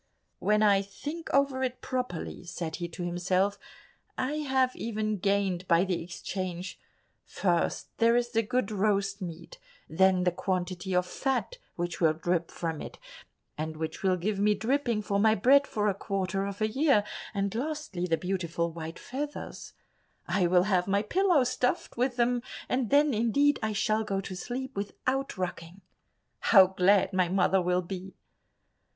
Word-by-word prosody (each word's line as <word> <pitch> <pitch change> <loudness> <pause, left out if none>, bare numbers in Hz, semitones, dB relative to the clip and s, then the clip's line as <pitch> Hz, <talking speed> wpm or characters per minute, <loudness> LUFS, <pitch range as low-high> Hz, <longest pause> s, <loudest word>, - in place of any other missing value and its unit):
"When 210 +1 +2
I 200 -2 +5
think 295 +12 -7
over 275 -1 +2
it 255 -1 -2
properly," 250 -11 -4
said 170 -2 -5
he 175 0 -3
to 170 +1 -7
himself, 185 +3 0 0.6
"I 280 +4 -1
have 265 -3 +1
even 215 -2 -2
gained 195 -2 0
by 170 0 +4
the 185 -3 -1
exchange; 180 +1 -5 0.4
first 175 -3 -1
there 230 +1 +5
is 240 0 +1
the 225 -1 +2
good 235 -1 -1
roast 200 -1 0
meat, 180 - -8 0.3
then 185 +2 +3
the 180 - +3
quantity 185 +1 -2
of 180 0 +3
fat 270 - -2 0.2
which 175 0 -4
will 160 -2 +5
drip 170 +1 -1
from 165 -3 -4
it, - - -8 0.6
and 155 0 -3
which 160 0 -4
will 185 -2 +2
give 195 +3 -2
me 210 +1 +3
dripping 235 -1 0
for 200 0 0
my 220 +1 +5
bread 275 +7 +5
for 210 -1 -1
a 200 - +2
quarter 195 0 -2
of 200 +1 -7
a 215 - +3
year, 265 -2 +3 0.3
and 200 -1 -1
lastly 255 - -3
the 165 -2 +2
beautiful 170 -2 -2
white 165 0 -7
feathers; 290 +3 -6 0.5
I 180 +1 +2
will 180 0 +4
have 185 -2 +1
my 200 +1 +2
pillow 355 - +3
stuffed 250 0 -1
with 250 +1 0
them, 245 0 +2 0.3
and 250 -3 0
then 290 0 +4
indeed 235 +7 +2
I 220 -1 -1
shall 215 +2 +1
go 195 -3 -2
to 195 -1 -6
sleep 255 +7 -5
without 255 +7 -2
rocking. 180 0 -5 0.6
How 195 -4 +7
glad 190 +1 +3
my 185 -2 +2
mother 190 0 +3
will 180 +1 +1
be!" 190 +1 -7
200 Hz, 165 wpm, -29 LUFS, 180-245 Hz, 0.6 s, How